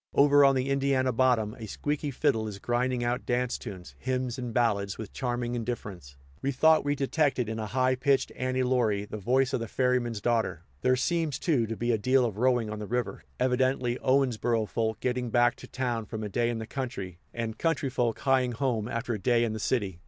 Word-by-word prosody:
Over 145 Hz, 0 st, +6 dB
on 135 Hz, -1 st, +5 dB
the 130 Hz, +1 st, 0 dB
Indiana 135 Hz, -1 st, +2 dB
bottom, 120 Hz, -4 st, +2 dB
a 110 Hz, -, -6 dB
squeaky 145 Hz, +6 st, -2 dB
fiddle 125 Hz, -5 st, 0 dB
is 105 Hz, -2 st, -6 dB
grinding 120 Hz, +3 st, 0 dB
out 120 Hz, +1 st, -1 dB
dance 125 Hz, 0 st, -1 dB
tunes, 90 Hz, -, -9 dB
hymns 130 Hz, -1 st, -2 dB
and 125 Hz, -2 st, -4 dB
ballads 105 Hz, -4 st, +1 dB
with 110 Hz, -, -8 dB
charming 120 Hz, -2 st, -2 dB
indifference. 105 Hz, -, -5 dB, 0.2 s
We 140 Hz, -, 0 dB
thought 160 Hz, +4 st, +4 dB
we 145 Hz, 0 st, 0 dB
detected 135 Hz, -3 st, +1 dB
in 110 Hz, 0 st, -4 dB
a 110 Hz, -, -3 dB
high 130 Hz, +3 st, +2 dB
pitched 135 Hz, +1 st, +1 dB
"Annie 130 Hz, 0 st, -1 dB
Laurie" 115 Hz, -6 st, +1 dB
the 110 Hz, -, -7 dB
voice 130 Hz, +6 st, +1 dB
of -, -, +1 dB
the 115 Hz, -, -4 dB
ferryman's 125 Hz, -3 st, 0 dB
daughter. 115 Hz, -7 st, 0 dB, 0.2 s
There 130 Hz, -, +3 dB
seems, 160 Hz, +1 st, 0 dB
too, 140 Hz, -9 st, +1 dB
to 115 Hz, 0 st, -4 dB
be 120 Hz, +1 st, 0 dB
a 110 Hz, -, +1 dB
deal 130 Hz, +3 st, +3 dB
of 110 Hz, -4 st, -3 dB
rowing 125 Hz, -2 st, +2 dB
on 105 Hz, 0 st, -5 dB
the 105 Hz, -, -5 dB
river, 125 Hz, +1 st, -2 dB, 0.2 s
evidently 130 Hz, -1 st, +1 dB
Owensboro 120 Hz, -4 st, +1 dB
folk 110 Hz, +1 st, -1 dB
getting 125 Hz, -1 st, -1 dB
back 120 Hz, +1 st, +3 dB
to -, -, -11 dB
town 120 Hz, -4 st, -2 dB
from 110 Hz, 0 st, -5 dB
a 105 Hz, -, -3 dB
day 120 Hz, +4 st, +1 dB
in 120 Hz, -, -2 dB
the 110 Hz, -, -5 dB
country, 100 Hz, -9 st, -5 dB
and 115 Hz, -1 st, -4 dB
country 165 Hz, -5 st, 0 dB
folk 120 Hz, -3 st, 0 dB
hieing 130 Hz, -2 st, +2 dB
home 115 Hz, -4 st, -1 dB
after 115 Hz, 0 st, -2 dB
a 110 Hz, -, -3 dB
day 120 Hz, +2 st, +2 dB
in 115 Hz, -2 st, -1 dB
the 110 Hz, -, -4 dB
city. 100 Hz, -7 st, -1 dB
120 Hz, 210 wpm, -28 LUFS, 110-130 Hz, 0.2 s, Over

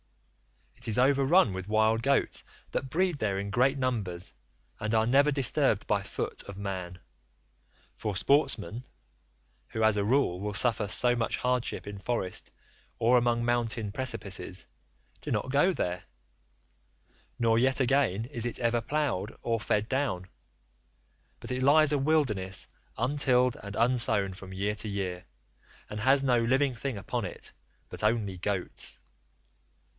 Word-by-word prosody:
It -, -, -8 dB
is 110 Hz, 0 st, +2 dB
over 135 Hz, +2 st, +4 dB
run 135 Hz, -, +4 dB
with 95 Hz, 0 st, -5 dB
wild 110 Hz, +1 st, +2 dB
goats, 140 Hz, +3 st, +1 dB, 0.3 s
that 135 Hz, -, -2 dB
breed 175 Hz, 0 st, 0 dB
there 100 Hz, -3 st, 0 dB
in 100 Hz, +1 st, -3 dB
great 130 Hz, +6 st, +3 dB
numbers 105 Hz, -9 st, -2 dB, 0.5 s
and 110 Hz, +1 st, -1 dB
are 110 Hz, 0 st, +3 dB
never 140 Hz, +5 st, +4 dB
disturbed 135 Hz, -4 st, +1 dB
by -, -, +1 dB
foot -, -, -5 dB
of 100 Hz, -1 st, -8 dB
man; 95 Hz, -3 st, -5 dB, 1.0 s
for 105 Hz, -2 st, -4 dB
sportsmen—who 95 Hz, -, -2 dB
as 110 Hz, -1 st, +4 dB
a 100 Hz, -, +1 dB
rule 110 Hz, -5 st, +2 dB
will 105 Hz, +1 st, -3 dB
suffer 110 Hz, -3 st, +2 dB
so 120 Hz, +3 st, +3 dB
much 115 Hz, -1 st, -1 dB
hardship 125 Hz, -1 st, -1 dB
in 100 Hz, -1 st, -7 dB
forest 95 Hz, -3 st, -2 dB, 0.5 s
or 120 Hz, +2 st, +4 dB
among 120 Hz, -1 st, +1 dB
mountain 115 Hz, -3 st, 0 dB
precipices—do 95 Hz, -, -5 dB
not 130 Hz, -, -1 dB
go 145 Hz, +7 st, +4 dB
there, 90 Hz, -, -3 dB, 1.3 s
nor 115 Hz, -2 st, +3 dB
yet 130 Hz, +2 st, +2 dB
again 125 Hz, -6 st, +2 dB
is 120 Hz, -3 st, -2 dB
it 120 Hz, -, -3 dB
ever 120 Hz, -1 st, +1 dB
ploughed 120 Hz, -7 st, -2 dB
or 115 Hz, -1 st, 0 dB
fed 105 Hz, 0 st, 0 dB
down, 125 Hz, -10 st, -1 dB, 1.1 s
but -, -, -7 dB
it 125 Hz, 0 st, -1 dB
lies 150 Hz, +2 st, +5 dB
a 145 Hz, -, +2 dB
wilderness 120 Hz, -, +1 dB, 0.3 s
untilled 125 Hz, -1 st, +2 dB
and 100 Hz, 0 st, -7 dB
unsown 110 Hz, -4 st, +2 dB
from 95 Hz, 0 st, -11 dB
year 100 Hz, +2 st, -1 dB
to 105 Hz, +1 st, -2 dB
year, 95 Hz, -3 st, -3 dB, 0.7 s
and 105 Hz, -, -4 dB
has 135 Hz, +5 st, +4 dB
no 125 Hz, -3 st, +3 dB
living 130 Hz, +3 st, +2 dB
thing 120 Hz, 0 st, -4 dB
upon 100 Hz, -, -3 dB
it -, -, -7 dB, 0.4 s
but -, -, -6 dB
only 105 Hz, -4 st, 0 dB
goats. 95 Hz, -1 st, -3 dB
115 Hz, 145 wpm, -29 LUFS, 100-130 Hz, 1.3 s, lies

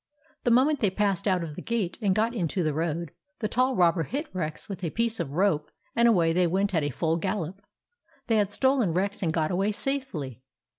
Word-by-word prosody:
The -, -, +4 dB
moment 265 Hz, +5 st, +4 dB
they 210 Hz, -, +3 dB
passed 200 Hz, 0 st, 0 dB
out 185 Hz, -3 st, +2 dB
of 155 Hz, -3 st, -6 dB
the -, -, -6 dB
gate 225 Hz, -7 st, -2 dB
and 195 Hz, -3 st, +2 dB
got 225 Hz, +3 st, +1 dB
into 180 Hz, -4 st, -1 dB
the 155 Hz, -2 st, 0 dB
road, 165 Hz, 0 st, -2 dB, 0.3 s
the 215 Hz, -, -1 dB
tall 255 Hz, +4 st, +1 dB
robber 175 Hz, -2 st, +3 dB
hit 285 Hz, -, -4 dB
Rex 160 Hz, -4 st, -4 dB
with 195 Hz, -2 st, -7 dB
a 170 Hz, -, 0 dB
piece 230 Hz, +3 st, -1 dB
of 150 Hz, -5 st, -3 dB
rope 165 Hz, -4 st, +1 dB, 0.3 s
and 235 Hz, 0 st, +5 dB
away 170 Hz, -8 st, +4 dB
they 180 Hz, 0 st, +3 dB
went 195 Hz, +4 st, 0 dB
at 165 Hz, -, +2 dB
a 145 Hz, -, -1 dB
full 160 Hz, +4 st, 0 dB
gallop. 190 Hz, 0 st, -3 dB, 0.6 s
They 225 Hz, -2 st, +2 dB
had 205 Hz, -2 st, +2 dB
stolen 260 Hz, -5 st, +2 dB
Rex 200 Hz, +2 st, -1 dB
and 170 Hz, -4 st, +1 dB
got 160 Hz, 0 st, 0 dB
away 195 Hz, +4 st, +1 dB
safely. 205 Hz, -, -3 dB
190 Hz, 215 wpm, -27 LUFS, 165-225 Hz, 0.6 s, and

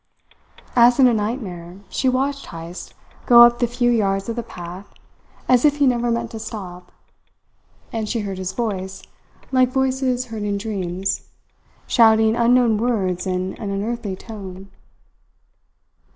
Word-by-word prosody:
As 240 Hz, 0 st, +6 dB
in 265 Hz, -, +7 dB
a 245 Hz, -, +5 dB
nightmare 200 Hz, -6 st, -4 dB
she 260 Hz, -, 0 dB
watched 275 Hz, +2 st, -1 dB
Heyst 165 Hz, +1 st, -9 dB, 0.3 s
go 240 Hz, -2 st, +9 dB
up 240 Hz, 0 st, +5 dB
the 240 Hz, -, +2 dB
few 240 Hz, +1 st, +1 dB
yards 195 Hz, -3 st, 0 dB
of 230 Hz, -, -3 dB
the 240 Hz, -, -2 dB
path 180 Hz, -2 st, -10 dB, 0.6 s
as 250 Hz, -1 st, +4 dB
if 295 Hz, -1 st, +4 dB
he 285 Hz, -, +3 dB
never 240 Hz, -2 st, +1 dB
meant 235 Hz, 0 st, -2 dB
to 225 Hz, -, -7 dB
stop; 190 Hz, -5 st, -8 dB, 1.0 s
and 220 Hz, -2 st, -3 dB
she 230 Hz, -, -1 dB
heard 195 Hz, -2 st, -5 dB
his 185 Hz, 0 st, -3 dB
voice, 190 Hz, -3 st, -4 dB, 0.5 s
like 255 Hz, -1 st, +3 dB
voices 260 Hz, -1 st, 0 dB
heard 220 Hz, -, -4 dB
in 205 Hz, -1 st, -1 dB
dreams, 190 Hz, -2 st, -3 dB, 0.6 s
shouting 220 Hz, -1 st, +4 dB
unknown 235 Hz, -2 st, +3 dB
words 190 Hz, -7 st, -1 dB
in 185 Hz, 0 st, -2 dB
an 205 Hz, -, -3 dB
unearthly 205 Hz, 0 st, -3 dB
tone. 195 Hz, -3 st, -10 dB
220 Hz, 145 wpm, -21 LUFS, 190-240 Hz, 1.0 s, go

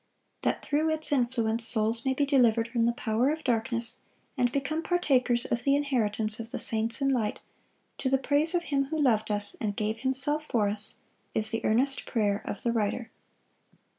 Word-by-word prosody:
That -, -, -2 dB
through 305 Hz, +2 st, 0 dB
its 315 Hz, -1 st, 0 dB
influence 235 Hz, -4 st, 0 dB
souls 225 Hz, +1 st, +5 dB
may 265 Hz, 0 st, 0 dB
be 285 Hz, -, 0 dB
delivered 235 Hz, -5 st, +2 dB
from 230 Hz, -1 st, 0 dB
the -, -, +2 dB
power 235 Hz, +2 st, -1 dB
of 310 Hz, +1 st, -4 dB
darkness, 235 Hz, -1 st, -1 dB, 0.4 s
and 245 Hz, -3 st, 0 dB
become 280 Hz, +4 st, -3 dB
"partakers 255 Hz, -9 st, 0 dB
of 235 Hz, 0 st, -3 dB
the 275 Hz, +1 st, +2 dB
inheritance 220 Hz, -6 st, +1 dB
of 230 Hz, 0 st, -7 dB
the -, -, -6 dB
saints 225 Hz, +3 st, +1 dB
in 275 Hz, -, +1 dB
light," 235 Hz, -6 st, -2 dB, 0.6 s
to 260 Hz, -, -2 dB
the 270 Hz, -, +2 dB
praise 290 Hz, +5 st, +2 dB
of 345 Hz, -, 0 dB
Him 275 Hz, -4 st, -1 dB
who 315 Hz, +3 st, -5 dB
loved 220 Hz, -6 st, +1 dB
us, 205 Hz, -1 st, +2 dB
and 205 Hz, -2 st, -3 dB
gave 215 Hz, +1 st, -3 dB
Himself 270 Hz, +4 st, +3 dB
for 215 Hz, -4 st, 0 dB
us, 205 Hz, +1 st, 0 dB, 0.3 s
is 220 Hz, +1 st, +3 dB
the 225 Hz, -, -3 dB
earnest 265 Hz, +5 st, 0 dB
prayer 210 Hz, -3 st, -1 dB
of 205 Hz, -, -6 dB
the 235 Hz, -, 0 dB
writer. 225 Hz, +1 st, -3 dB
240 Hz, 190 wpm, -27 LUFS, 220-275 Hz, 0.6 s, souls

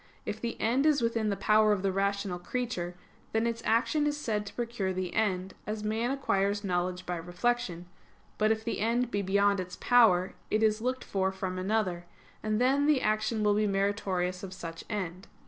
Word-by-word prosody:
If 215 Hz, -, -4 dB
the 235 Hz, -1 st, -3 dB
end 255 Hz, +6 st, +2 dB
is 290 Hz, -5 st, +3 dB
within 230 Hz, -2 st, +1 dB
the 200 Hz, -, 0 dB
power 215 Hz, +2 st, +4 dB
of 200 Hz, -2 st, +1 dB
the 195 Hz, -, +2 dB
rational 195 Hz, -1 st, -1 dB
creature, 180 Hz, -3 st, -3 dB, 0.4 s
then 225 Hz, +1 st, +2 dB
its 230 Hz, 0 st, -1 dB
action 295 Hz, +6 st, +2 dB
is 295 Hz, 0 st, -1 dB
said 210 Hz, -7 st, -2 dB
to -, -, -8 dB
procure 235 Hz, -5 st, -2 dB
the 185 Hz, -1 st, -3 dB
end; 190 Hz, -3 st, 0 dB
as 210 Hz, 0 st, -3 dB
man 220 Hz, +3 st, 0 dB
acquires 205 Hz, -7 st, 0 dB
knowledge 180 Hz, -1 st, -1 dB
by 175 Hz, 0 st, -2 dB
reflection: 175 Hz, +1 st, -1 dB, 0.5 s
but 215 Hz, 0 st, +4 dB
if 220 Hz, 0 st, 0 dB
the 230 Hz, -, -2 dB
end 235 Hz, +3 st, +1 dB
be 205 Hz, -, 0 dB
beyond 200 Hz, +1 st, +2 dB
its 180 Hz, -1 st, -5 dB
power, 215 Hz, -7 st, +4 dB, 0.2 s
and 215 Hz, +1 st, +2 dB
is 215 Hz, 0 st, +2 dB
looked 255 Hz, +2 st, -1 dB
for 190 Hz, -1 st, 0 dB
from 190 Hz, -1 st, -4 dB
another, 185 Hz, -3 st, 0 dB, 0.4 s
then 250 Hz, +7 st, +2 dB
the 300 Hz, -3 st, +4 dB
action 215 Hz, +1 st, +1 dB
will 210 Hz, 0 st, +4 dB
be 210 Hz, +1 st, +2 dB
meritorious 195 Hz, -2 st, 0 dB
of 190 Hz, -1 st, -7 dB
such 165 Hz, -3 st, -7 dB
end. 185 Hz, -3 st, -4 dB
210 Hz, 190 wpm, -30 LUFS, 185-230 Hz, 0.5 s, power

